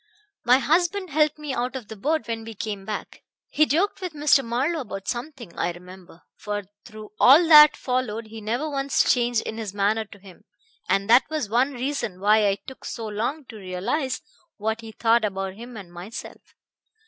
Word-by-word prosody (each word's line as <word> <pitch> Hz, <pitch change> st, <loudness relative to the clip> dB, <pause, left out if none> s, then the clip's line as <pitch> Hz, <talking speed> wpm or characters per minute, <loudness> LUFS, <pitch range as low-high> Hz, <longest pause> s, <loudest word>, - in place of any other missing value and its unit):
"My 250 Hz, +1 st, +6 dB
husband 350 Hz, +6 st, +1 dB
helped 300 Hz, +1 st, +2 dB
me 300 Hz, -3 st, -5 dB
out 250 Hz, +1 st, -2 dB
of 250 Hz, -5 st, -6 dB
the 220 Hz, -, -8 dB
boat 280 Hz, +2 st, -1 dB
when 225 Hz, -1 st, -4 dB
we 225 Hz, 0 st, -9 dB
came 205 Hz, -2 st, -5 dB
back. 215 Hz, 0 st, -6 dB, 0.3 s
He 305 Hz, 0 st, +3 dB
joked 385 Hz, +7 st, 0 dB
with 365 Hz, -3 st, -4 dB
Mr. 290 Hz, -2 st, +3 dB
Marlowe 260 Hz, +8 st, -1 dB
about 195 Hz, -8 st, -7 dB
something, 240 Hz, -, -6 dB
I 175 Hz, -, -1 dB
remember; 180 Hz, -1 st, -14 dB
for 205 Hz, 0 st, -4 dB, 0.2 s
through 215 Hz, -2 st, -11 dB
all 300 Hz, +7 st, +7 dB
that 300 Hz, -1 st, +9 dB
followed 250 Hz, -3 st, -2 dB
he 220 Hz, 0 st, -10 dB
never 240 Hz, +8 st, -2 dB
once 275 Hz, -2 st, +2 dB
changed 240 Hz, -2 st, 0 dB
in 220 Hz, -, -6 dB
his 205 Hz, -3 st, -6 dB
manner 210 Hz, +2 st, +1 dB
to 200 Hz, -, -15 dB
him, 190 Hz, -2 st, -16 dB, 0.4 s
and 195 Hz, 0 st, +1 dB
that 240 Hz, +5 st, +5 dB
was 305 Hz, -9 st, -3 dB
one 250 Hz, +6 st, +2 dB
reason 250 Hz, -7 st, -3 dB
why 210 Hz, +1 st, +4 dB
I 195 Hz, -, +2 dB
took 265 Hz, -, -11 dB
so 230 Hz, -, -5 dB
long 235 Hz, +8 st, -3 dB
to 220 Hz, -, -9 dB
realize 200 Hz, -, -3 dB, 0.4 s
what 220 Hz, +2 st, -2 dB
he 225 Hz, -1 st, -9 dB
thought 230 Hz, +1 st, +2 dB
about 195 Hz, -2 st, -2 dB
him 235 Hz, +3 st, -10 dB
and 180 Hz, -4 st, -11 dB
myself. 180 Hz, +6 st, -9 dB
230 Hz, 190 wpm, -24 LUFS, 210-275 Hz, 0.4 s, that